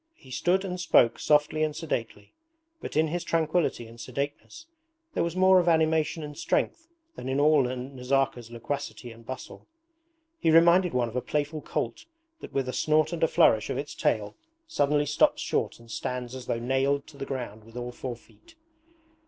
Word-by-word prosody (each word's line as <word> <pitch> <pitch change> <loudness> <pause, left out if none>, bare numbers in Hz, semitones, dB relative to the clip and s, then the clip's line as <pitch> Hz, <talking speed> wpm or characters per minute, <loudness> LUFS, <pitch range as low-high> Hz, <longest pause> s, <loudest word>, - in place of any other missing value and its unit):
He 130 - -17
stood 185 +8 +1
and 180 -1 -4
spoke 120 -8 +4
softly 150 +1 +2
and 155 -1 0
sedately, 115 -9 -4 0.5
but - - -5
in 160 0 +3
his 175 +2 -2
tranquillity 165 -6 0
and 115 +1 -12
sedateness 145 - -5 0.5
there - - +1
was 170 0 -2
more 185 0 +6
of 175 - 0
animation 160 -1 +2
and 150 0 -7
strength 330 - -1 0.3
than 130 - -6
in 135 +1 0
all 150 0 +5
Nazarka's 125 -1 -1
loquacity 120 +1 -5
and 115 0 -14
bustle. 130 -1 -8 0.7
He - - +2
reminded 170 +1 +5
one 120 -1 +2
of 115 - -9
a 125 - 0
playful 150 +2 -2
colt 325 - -4 0.3
that - - -10
with 135 -2 -1
a 130 - -3
snort 155 +2 +2
and 170 - -4
a 165 - +5
flourish 110 -7 +4
of - - -2
its 145 +1 -4
tail 105 -2 -1 0.3
suddenly 145 - +1
stops 145 +1 +2
short - - -1
and 115 -1 -15
stands 125 +1 -4
as 130 -2 -8
though - - 0
nailed 135 +3 +1
to 150 - -15
the 135 - -5
ground 120 -5 -5
with 115 +2 -13
all 125 0 -4
four 125 0 -5
feet. 330 - -22
140 Hz, 185 wpm, -27 LUFS, 125-160 Hz, 0.7 s, more